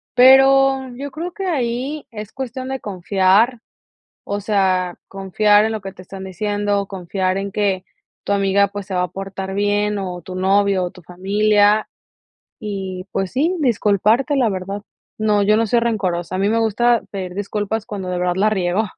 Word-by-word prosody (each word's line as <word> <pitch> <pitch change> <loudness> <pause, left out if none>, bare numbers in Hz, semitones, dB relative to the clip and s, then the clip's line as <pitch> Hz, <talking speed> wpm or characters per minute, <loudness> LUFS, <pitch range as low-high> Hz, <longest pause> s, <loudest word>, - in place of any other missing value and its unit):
Pero, 270 +1 +6
yo 285 0 -6
creo 340 +5 -5
que 390 - -5
ahí, 270 -1 -2
es 210 -1 -8
cuestión 260 0 -5
de 265 0 -3
confiar, 200 +5 +2 0.7
o 200 0 -2
sea, 185 -3 +1
confiar 205 +2 +3
en 220 - -1
lo 215 - -4
que 195 -1 -7
te 185 - -13
están 190 +1 -9
diciendo, 205 +1 -1
confiar 185 0 -2
en 200 0 -4
que 195 -2 0 0.4
tu - - -2
amiga, 200 0 +3
pues, 200 -1 -6
se 190 - -6
va 180 - +1
a 180 - -3
portar 195 0 -6
bien, 205 0 +1
o 180 -2 -5
tu 185 +2 -9
novio, 195 0 +2
o 175 - -5
tu 180 - -15
familia. 205 +4 +2 0.7
Y, 190 -3 -5
pues, 190 -1 -2
sí, 315 +8 +1
disculparte, 230 +2 +2
la 245 -4 +3
verdad. 195 +1 -4 0.4
No, 210 -1 +2
yo 210 +2 +4
no 230 - +1
soy 235 +3 +2
rencorosa. 185 -6 -1
A - - -3
mí 200 +2 +2
me 225 +1 +2
gusta 230 +2 +2
pedir 185 -2 -5
disculpas 205 +2 -3
cuando 195 -3 -5
de 180 -1 -2
verdad 180 0 0
la 210 +3 +3
riego. 190 +1 0
205 Hz, 180 wpm, -20 LUFS, 190-225 Hz, 0.7 s, Pero